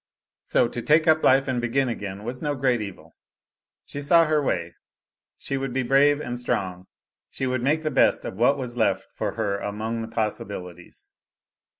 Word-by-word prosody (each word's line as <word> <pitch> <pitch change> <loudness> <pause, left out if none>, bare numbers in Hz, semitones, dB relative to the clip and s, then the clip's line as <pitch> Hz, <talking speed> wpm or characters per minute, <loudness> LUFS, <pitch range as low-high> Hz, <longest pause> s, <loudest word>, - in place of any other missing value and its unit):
So, - - +2
to 120 - -5
take 155 +6 +3
up 160 0 +4
life 135 +1 +4
and 125 -2 -1
begin 130 +3 +1
again 100 -4 -5
was 125 +3 -5
no 145 -1 -1
great 130 -3 +1
evil. 90 -6 -9 0.7
She 145 - -6
saw 165 +3 +5
her 155 -1 +2
way. 85 -10 -2 0.6
She 135 - -3
would 135 -2 -3
be 130 0 0
brave 140 +3 +4
and 120 -4 -4
strong; 95 -6 -3 0.4
she 135 - -4
would 130 -1 -1
make 150 +5 +1
the 155 - -1
best - - +3
of 95 - -6
what 130 +4 +4
was 125 -3 -5
left 115 -2 0
for - - -3
her 100 -3 -2
among 110 +3 -3
the 115 - -5
possibilities. 100 -5 -5
125 Hz, 185 wpm, -24 LUFS, 105-140 Hz, 0.7 s, saw